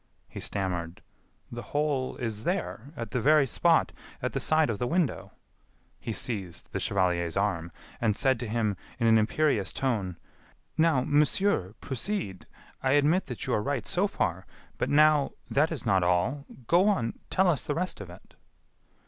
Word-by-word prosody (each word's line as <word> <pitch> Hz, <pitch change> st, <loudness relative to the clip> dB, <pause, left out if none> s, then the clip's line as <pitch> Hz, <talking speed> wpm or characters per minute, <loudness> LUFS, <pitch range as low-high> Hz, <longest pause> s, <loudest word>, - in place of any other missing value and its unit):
He -, -, -8 dB
stammered: 90 Hz, -4 st, -3 dB, 0.5 s
"The 120 Hz, 0 st, -5 dB
hole 145 Hz, -2 st, -1 dB
is 110 Hz, -3 st, -4 dB
there, 145 Hz, -, -3 dB
at 115 Hz, -3 st, -5 dB
the 125 Hz, -, -1 dB
very 150 Hz, +3 st, +5 dB
spot, 165 Hz, +5 st, +2 dB, 0.3 s
at 125 Hz, -2 st, -3 dB
the 135 Hz, -, -1 dB
side 155 Hz, +4 st, +3 dB
of 105 Hz, -, -4 dB
the 125 Hz, -, 0 dB
window 165 Hz, -3 st, -1 dB, 0.3 s
" -, -, -42 dB, 0.3 s
He 115 Hz, -, -5 dB
seized 100 Hz, -6 st, -4 dB
the -, -, -2 dB
chevalier's 90 Hz, -3 st, 0 dB
arm, 85 Hz, -5 st, -1 dB, 0.3 s
and 110 Hz, -3 st, +2 dB
said 130 Hz, -1 st, +2 dB
to 120 Hz, -, -4 dB
him 110 Hz, -3 st, 0 dB, 0.2 s
in 120 Hz, -, 0 dB
an 110 Hz, -1 st, +6 dB
imperious 110 Hz, -2 st, +1 dB
tone: 105 Hz, -10 st, -1 dB, 0.6 s
"Now, 160 Hz, -5 st, +3 dB
monsieur, 145 Hz, -, +2 dB
proceed. 135 Hz, -, -4 dB, 0.3 s
I 130 Hz, 0 st, +2 dB
admit 150 Hz, +6 st, +3 dB
that 125 Hz, -4 st, -5 dB
you -, -, -1 dB
are 105 Hz, -, +2 dB
right 135 Hz, -1 st, -2 dB
so 190 Hz, +3 st, +1 dB
far, 90 Hz, -, -2 dB, 0.3 s
but -, -, 0 dB
now.... 150 Hz, -1 st, +4 dB, 0.2 s
that 150 Hz, +4 st, +3 dB
is 150 Hz, -8 st, -4 dB
not 95 Hz, -4 st, +3 dB
all.... 90 Hz, +11 st, +1 dB, 0.2 s
go 175 Hz, -, +4 dB
on.... 115 Hz, -, -1 dB
tell 190 Hz, 0 st, +3 dB
us 160 Hz, -7 st, +2 dB
the 145 Hz, -, -2 dB
rest 180 Hz, -, -2 dB
of 100 Hz, -, -8 dB
it." 90 Hz, -, -14 dB
125 Hz, 175 wpm, -28 LUFS, 100-150 Hz, 0.6 s, an